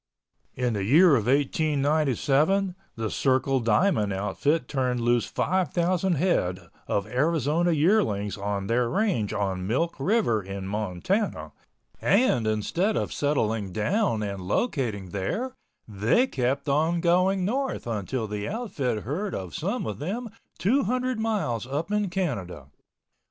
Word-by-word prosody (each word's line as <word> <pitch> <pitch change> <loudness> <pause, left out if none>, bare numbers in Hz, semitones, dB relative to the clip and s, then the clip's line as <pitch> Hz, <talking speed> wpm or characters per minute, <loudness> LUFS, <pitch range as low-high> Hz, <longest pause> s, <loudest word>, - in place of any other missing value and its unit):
In 125 -2 0
the 100 -2 -2
year 155 - +6
of 115 -3 0
1897 150 - +2 0.2
the 110 -2 -3
Circle 135 0 +1
Diamond 115 - +2
outfit 105 +11 0
turned 125 -3 -1
loose 120 0 +2
5,000 185 0 0
head 90 - 0 0.2
of 100 - 0
Arizona 155 +7 +1
yearlings 150 - +2
on 100 -1 -3
their 115 +3 +1
range 185 - 0
on 95 -2 -2
Milk 165 +10 0
River 140 - +2
in 95 0 -6
Montana 105 - -2 0.5
and 125 - +3
instead 170 - 0
of - - -2
settling 115 -9 0
down 115 - 0
and 100 -2 -4
locating 105 - -1
there 210 - -2 0.3
they 110 - +2
kept 135 - -1
on 160 +5 +2
going 180 +2 +2
north 265 +6 -2
until 115 +1 -2
the 105 0 -4
outfit 145 - -2
heard 180 - -3
of 90 -4 -6
some - - -2
of 105 - -4
them 210 - -4 0.3
200 255 +3 +1
miles 200 - -1
up 150 +8 -3
in 210 -2 +1
Canada. 95 - -3
135 Hz, 130 wpm, -26 LUFS, -, 0.5 s, year